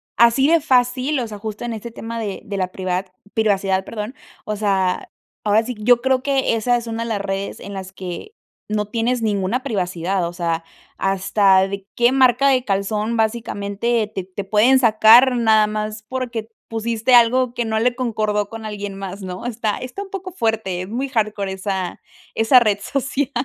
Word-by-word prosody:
así 235 +5 +5
de 330 0 +4
fácil, 255 +1 +2
o 240 - -2
sea, 210 -2 -8
justo 215 +2 -5
en 235 - -3
este 225 +2 -6
tema 230 0 -6
de 205 -4 -4
de 200 -1 -4
la 185 -1 -1
privat 185 0 -3 0.2
privacidad. 195 -3 +1
Perdón, 215 +3 -6 0.3
o 215 - -2
sea, 195 -3 0 0.3
ahora 215 +1 +3
sí, 245 +2 -5
yo 240 +2 +4
creo 260 0 +2
que 270 -3 +1
esa 245 +2 +1
es 240 - -6
una 230 0 -3
de 230 - -5
las 210 -3 -1
redes 195 0 -4
en 200 - -8
las 190 -1 -7
que 185 - -7 0.4
no 210 0 0
tienes 235 +1 0
ninguna 205 +4 0
privacidad, 185 -5 -1
o 170 - -7
sea, 165 -2 -2 0.3
hasta 195 0 +3
de 195 0 -6
qué 240 +1 +4
marca 260 0 +4
de 255 -2 +3
calzón 210 +1 -1
básicamente 220 0 -1
te 190 - -3
te 190 +2 -6
pueden 215 +7 +4
sacar 235 +2 +6
nada 220 -2 +4
más 215 0 -4
porque 235 -4 -4 0.2
pusiste 230 +2 +1
algo 240 +1 +4
que 240 - -1
no 220 0 0
le 245 +1 +1
concordó 215 -4 -1
con 225 -1 -8
alguien 205 -2 -5
más, 195 0 -7
¿no? 185 +5 -5
Está 220 -3 -2
está 255 +11 -6
un 390 - -14
poco 380 -1 -6
fuerte. 220 - -1
Es 185 - -9
muy 255 +5 -3
hardcore 215 -5 -1
esa 190 -1 -3 0.4
esa 225 +4 +6
red 215 -4 +2
social. 275 +4 -2
220 Hz, 185 wpm, -20 LUFS, 200-245 Hz, 0.4 s, sacar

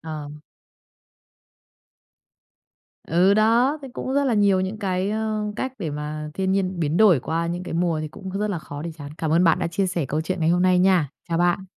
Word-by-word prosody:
Ờm. 150 -2 -7 2.7
Ừ, 180 +5 +4
đó, 235 +7 +3
thấy 270 -2 -9
cũng 260 - -4
rất 280 - +2
là 250 -4 +1
nhiều 200 -2 +3
những 190 +3 -3
cái, 190 -1 -1
a, 220 0 -1 0.2
cách 260 -1 -3
để 165 -6 -3
mà 150 +1 -5
thiên 190 0 0
nhiên 190 -2 -1
biến 155 0 0
đổi 185 - +5
qua 165 +4 -2
những 175 +1 -3
cái 180 - -6
mùa 165 -2 0
thì 155 - -4
cũng 190 +5 -9
rất 195 - -4
rất 210 - 0
là 195 -4 -2
khó 145 -2 -8
để 170 - -4
chán. 145 -1 -8
Cảm 160 - -2
ơn 170 +3 +4
bạn 165 -2 +4
đã - - -1
chia 180 +4 -1
sẻ 175 -4 -1
câu 155 +2 -1
chuyện 185 +2 -3
ngày 160 - +2
hôm 175 +1 +3
nay 185 -1 +4
nha. 180 -5 +3 0.2
Chào 165 - 0
bạn. 175 +2 +1
180 Hz, 225 wpm, -23 LUFS, 160-200 Hz, 2.7 s, đổi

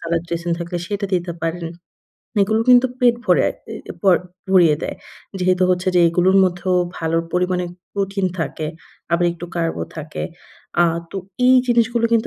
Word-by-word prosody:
সালাদ 165 0 -1
dressing 170 0 -3
থাকলে 170 +1 -4
সেটা 205 0 -2
দিতে 175 -1 -1
পারেন। 165 +1 -2 0.8
এগুলো 220 +2 +1
কিন্তু 250 +1 +7
পেট 240 -1 +4
ভরায়ে - - +3 0.2
অ্যা - - -8
প - - -13 0.5
ভরিয়ে 175 -5 +5
দেয়। - - -4 0.4
যেহেতু 185 0 +2
হচ্ছে 180 0 +1
যে 180 - +5
এইগুলোর 180 +3 +3
মধ্যেও 180 0 0 0.2
ভালোর 165 0 0
পরিমাণে 180 0 0 0.3
প্রোটিন 195 -1 -1
থাকে। 155 -1 -3 0.5
আবার 175 +1 +3
একটু 175 +1 -8
কার্বও 165 -1 -1
থাকে। 155 0 -6 0.6
আ - - +5 0.3
তো - - -6 0.3
এই 255 0 +7
জিনিসগুলো 235 -1 +2
কিন্তু 230 -1 +3
180 Hz, 155 wpm, -20 LUFS, 170-200 Hz, 0.8 s, কিন্তু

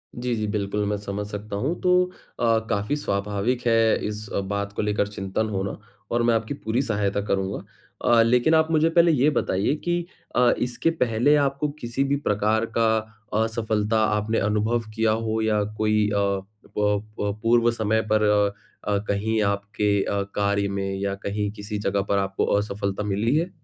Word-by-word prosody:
जी, 120 0 -2
जी। 110 -1 -2
बिल्कुल, 105 0 -1
मैं 105 - 0
समझ 100 0 -4
सकता 105 0 -6
हूँ। 140 - -1
तो 180 0 +4 0.4
अ, 115 -1 +3
काफ़ी 105 +5 0
स्वाभाविक 105 0 -1
है 115 -1 +3
इस 105 0 -5
अ, - - +1
बात 100 +1 -3
को - - -2
लेकर 105 -1 0
चिंतन 105 +2 -3
होना 95 -1 -3 0.3
और 120 0 +1
मैं 115 0 +3
आपकी 110 +5 -2
पूरी 120 -1 -1
सहायता 100 -5 0
करूँगा। 95 -1 -1 0.4
अ, 115 -1 +6
लेकिन 125 +7 +3
आप 160 0 +3
मुझे 160 +1 +3
पहले 170 0 +5
ये 145 0 +3
बताइए 105 -2 0
कि 175 +2 -2 0.3
अ, 125 0 +5
इसके 125 +6 0
पहले 120 +5 +3
आपको 140 +2 -1
किसी 120 +2 -1
भी 140 +1 +1
प्रकार 105 +2 +2
का 115 -1 +4 0.6
असफलता 110 -1 0 0.2
आपने 110 +2 0
अनुभव 110 +3 +1
किया 110 -1 +2
हो? 110 0 -1
या 105 -1 +2
कोई 105 -1 +2
अ 100 - 0
अ, 100 -1 +1 0.4
प 105 -1 +2 0.4
पूर्व 120 0 +4
समय 110 -1 +1
पर 110 0 +3
अ, 105 0 0
कहीं 110 +2 0
आपके 100 0 0
अ, 100 -1 -1
कार्य 100 0 +1
में 95 0 -2
या 100 0 -1
कहीं 105 0 -1
किसी 105 0 -6
जगह 100 -1 0
पर 100 - +2
आपको 95 0 0
असफलता 100 -1 -2
मिली 105 +6 0
है? 170 +4 +1
105 Hz, 175 wpm, -24 LUFS, 100-120 Hz, 0.6 s, अ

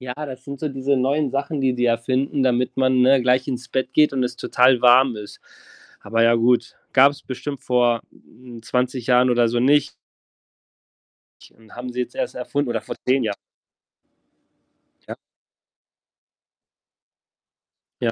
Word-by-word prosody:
ja, 125 -1 -6
das 135 -3 -8
sind 140 -1 -8
so 155 - -2
diese 135 0 -1
neuen 140 +2 0
Sachen, 140 +1 -3
die 130 -1 +1
die 125 0 0
erfinden, 130 +4 0
damit 125 0 0
man, 130 -1 +2
ne, 130 +1 +4
gleich 125 +1 +1
ins 125 -2 -5
Bett 130 0 -3
geht 150 -2 +3
und 130 -2 -1
es 125 -1 -3
total 125 +1 +2
warm 125 0 +5
ist. 105 -1 -10 0.6
Aber 115 0 -1
ja 115 0 +4
gut, 120 +1 +1 0.2
gab's 140 +2 +4
bestimmt 135 +2 -6
vor, 120 -2 +1
hm, 120 -2 -15
20 125 +1 -2
Jahren 125 0 +4
oder 120 -1 +2
so 120 +1 -1
nicht 145 +3 +2 1.6
und 110 -1 -18
haben 125 +1 -7
sie 125 - -4
jetzt 125 - -9
erst - - -4
erfunden, 140 +2 -3
oder 115 -2 -2
vor - - -7
10 130 0 +1
Jahren. 105 -2 -2 1.8
Ja. - - -5 2.9
Ja. 115 - 0
125 Hz, 150 wpm, -21 LUFS, 120-135 Hz, 2.9 s, warm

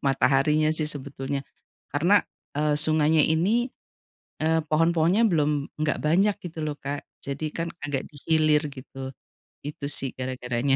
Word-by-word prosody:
mataharinya 150 +3 +3
sih 155 -1 -1
sebetulnya. 140 -1 -5 0.5
Karena, 175 +8 +5 0.4
eee, 150 0 +2
sungainya 155 +1 +3
ini, 205 - +2 0.7
eee, 160 +1 +2
pohon-pohonnya 165 +7 +3
belum, 150 -5 +1
enggak 155 0 0
banyak 190 +7 +3
gitu 165 -2 -7
loh, 150 -1 -2
Kak, 140 +1 -4 0.2
jadi 140 +2 -4
kan 165 +1 -3 0.2
agak 140 -2 -2
di 150 - -21
hilir, 155 -2 +3
gitu. 135 0 -8 0.5
Itu 145 0 -6
sih 135 -2 0
gara-garanya. 130 0 0
150 Hz, 135 wpm, -26 LUFS, 140-160 Hz, 0.7 s, Karena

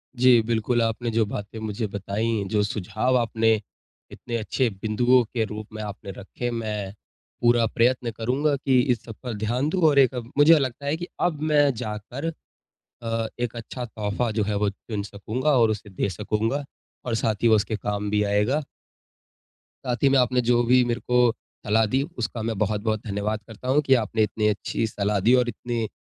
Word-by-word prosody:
जी। 125 -1 +6
बिल्कुल, 115 +1 0
आपने 115 +1 -1
जो 110 0 +2
बातें 105 +2 -6
मुझे 110 0 -3
बताईं, 100 +1 -2
जो 105 0 +1
सुझाव 110 +5 0
आपने 115 -1 +2 0.6
इतने 120 -1 -6
अच्छे 115 +3 0
बिंदुओं 120 +3 +3
के 115 0 -2
रूप 105 0 -7
में 110 - -5
आपने 100 -1 -7
रखे, 120 +5 -5
मैं 105 -4 -3 0.5
पूरा 120 -1 +4
प्रयत्न 120 +1 +1
करूँगा 130 +7 0
कि 135 -2 +2
इस 120 -3 -1
सब 115 - -8
पर 120 -2 -4
ध्यान 120 +7 0
दूँ। 185 +1 -1
और 140 -2 +4
एक 130 -1 +4 0.2
मुझे 155 +2 +7
लगता 135 +1 -3
है 145 +2 +1
कि 175 +1 -6
अब 160 -4 0
मैं 145 -1 +5
जाकर 110 +9 -4 0.7
अ, 115 -1 -2
एक 120 -1 -2
अच्छा 120 +2 -6
तोहफ़ा 110 +1 -2
जो 105 -1 0
है 105 0 -1
वो 105 0 +1
चुन 105 +1 -6
सकूँगा 110 +8 -3
और 115 -1 +5
उसे 105 0 -5
दे 100 +1 -2
सकूँगा 110 - -1 0.4
और 120 - -1
साथ 110 -1 -1
ही - - +6
वो 110 - +6
उसके 110 +1 0
काम 105 0 -3
भी 105 0 +1
आएगा। 105 +9 +1 1.2
साथ 125 +1 -2
ही 140 - +6
में 135 - +4
आपने 125 0 +2
जो 120 0 +4
भी 125 +1 +5
मेरे 120 0 -1
को 125 -1 +4 0.3
सलाह 110 +1 +3
दी, 130 +6 +1 0.2
उसका 120 -1 -3
मैं 110 -2 -2
बहुत-बहुत 110 0 0
धन्यवाद 105 +2 -2
करता 110 +3 -10
हूँ 140 +3 +4
कि 135 - +5
आपने 110 +1 0
इतनी 105 +1 0
अच्छी 105 +2 -1
सलाह 100 -1 -1
दी 125 - +7
और 120 - -1
इतनी 115 0 -3
115 Hz, 190 wpm, -24 LUFS, 105-125 Hz, 1.2 s, मुझे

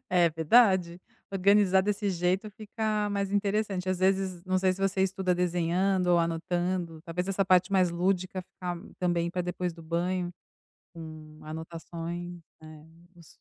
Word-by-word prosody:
É 175 -2 +4
verdade, 175 +1 +3 0.3
organizar 195 0 +4
desse 205 0 -1
jeito 185 +4 0
fica 215 0 -2
mais 200 -1 -1
interessante. 200 -2 0
Às 185 -1 0
vezes, 190 -1 +1
não 185 0 +1
sei 185 0 +2
se 190 - -8
você 195 -1 +1
estuda 190 -1 0
desenhando 180 +1 +1
ou 175 -1 +5
anotando, 170 0 -1
talvez 180 +2 -4
essa 195 0 +1
parte 185 +1 +3
mais 185 -2 +3
lúdica 185 +1 -1
ficar 180 0 -6 0.2
também 175 -2 +1
ficar 170 - -4
pra 180 - -1
depois 180 0 -3
do 165 0 -13
banho, 175 +2 -1 0.6
com 155 -2 -10
anotações. 165 +2 -6 0.2
É - - -11 0.5
isso. 170 -2 -16
180 Hz, 150 wpm, -28 LUFS, 170-195 Hz, 0.6 s, ou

